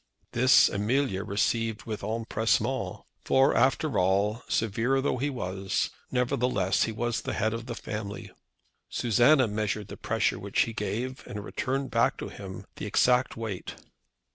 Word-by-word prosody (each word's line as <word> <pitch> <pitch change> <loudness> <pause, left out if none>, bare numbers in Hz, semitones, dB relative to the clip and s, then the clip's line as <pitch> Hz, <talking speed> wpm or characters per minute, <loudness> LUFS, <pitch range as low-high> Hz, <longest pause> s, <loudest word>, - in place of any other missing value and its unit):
This 130 +2 +6
Amelia 105 0 0
received 110 +2 0
with 110 -2 -5
empressement; 115 +3 -1 0.2
for, 135 +1 +4
after 135 +2 +2
all, 100 +5 +2
severe 115 +5 +1
though 135 -1 0
he 140 +4 0
was, 95 -7 -2 0.2
nevertheless 125 -6 +1
he 115 - -3
was 120 +1 -2
the - - -4
head 110 +2 0
of 115 +1 -5
the 120 - -4
family. 105 -2 -6 0.6
Susanna 120 +4 +4
measured 105 -1 -2
the - - -8
pressure 110 -3 0
which 100 0 0
he 115 - 0
gave, 120 +4 -3
and 105 -1 -6
returned 135 +1 -2
back - - +2
to - - -5
him 95 -2 -8
the - - -4
exact 125 -1 +3
weight. 110 -5 -5
115 Hz, 145 wpm, -28 LUFS, 105-125 Hz, 0.6 s, This